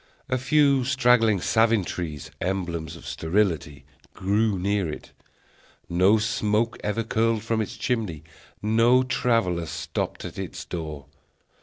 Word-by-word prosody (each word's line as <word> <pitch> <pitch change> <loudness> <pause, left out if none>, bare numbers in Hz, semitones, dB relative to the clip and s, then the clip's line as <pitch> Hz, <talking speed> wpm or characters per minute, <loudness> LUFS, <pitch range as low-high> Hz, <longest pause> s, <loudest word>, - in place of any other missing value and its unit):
A 130 0 +1
few 140 0 +3
straggling 125 -5 +3
savin 110 0 +3
trees, 80 -6 -5
emblems 85 -3 -3
of 85 - -13
sterility, 80 -6 -1 0.3
grew 100 +2 +1
near 100 -1 0
it; - - -9 0.8
no 95 +5 +4
smoke 110 +1 0
ever 105 +2 -1
curled 110 0 0
from 115 -1 0
its 110 - -5
chimney; 105 - -2 0.4
no 115 +4 +4
traveller 115 -10 0
stopped - - -4
at - - -7
its - - -6
door. 75 -4 -6
105 Hz, 125 wpm, -25 LUFS, 85-115 Hz, 0.8 s, no